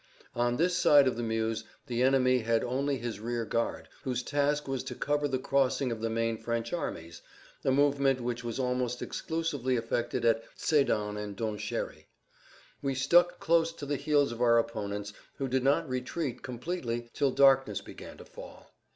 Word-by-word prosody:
On 120 0 +1
this 180 +2 +2
side 145 -6 +6
of 130 - +1
the 120 - -3
Meuse 110 -1 -1 0.2
the 120 0 -2
enemy 130 -1 +4
had 115 0 +1
only 135 +3 -1
his 115 -4 -5
rear 115 +1 -2
guard, 115 +1 -2
whose 125 -1 -2
task 145 +1 0
was 135 -2 -2
to 125 - -5
cover 145 +3 0
the 130 -2 -1
crossing 135 -1 +1
of 115 -1 -4
the 115 - -1
main 115 0 -1
French 115 +2 -3
armies, 85 - -5 0.4
a - - +1
movement 140 -1 +3
which 120 0 -3
was 115 -2 -4
almost 125 -1 -1
exclusively 150 -6 -2
effected 120 0 -1
at 115 0 +3
Sédan 105 -8 +1
and 100 -1 -7
Donchéry. 110 -1 -4 0.8
We 135 -1 -1
stuck 175 +7 +4
close 165 0 +3
to 150 - -8
the 145 +1 -1
heels 145 -1 +2
of 120 0 -6
our 115 -1 +5
opponents, 105 -3 -2 0.2
who 135 - -2
did 130 0 0
not 145 +4 +2
retreat 130 +1 -3
completely 120 -3 -4
till 140 -2 +2
darkness 135 0 +4
began - - -11
to - - -12
fall. - - -13
125 Hz, 175 wpm, -30 LUFS, 115-140 Hz, 0.8 s, side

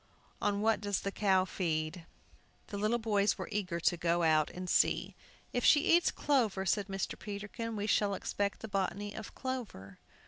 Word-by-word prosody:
On 205 0 +1
what 220 0 +2
does 205 -2 -1
the 200 - -2
cow 190 -2 +2
feed?" 165 -2 -2 0.6
The 200 - -4
little 215 +3 +2
boys 210 -3 +1
were - - -5
eager 185 -5 -2
to 175 - +2
go 170 +1 +1
out 155 -2 +3
and 180 0 -7
see. - - +2 0.4
"If 245 - 0
she 295 - +6
eats 345 - +3
clover," 225 -9 +1
said 200 +1 +1
Mr. 195 -1 -4
Peterkin, 210 +3 -5
"we 205 0 -2
shall 205 -1 +2
expect 200 +1 -2
the 220 - -5
botany 200 0 -2
of 220 - -8
clover." 220 - -6
200 Hz, 175 wpm, -32 LUFS, 180-215 Hz, 0.6 s, she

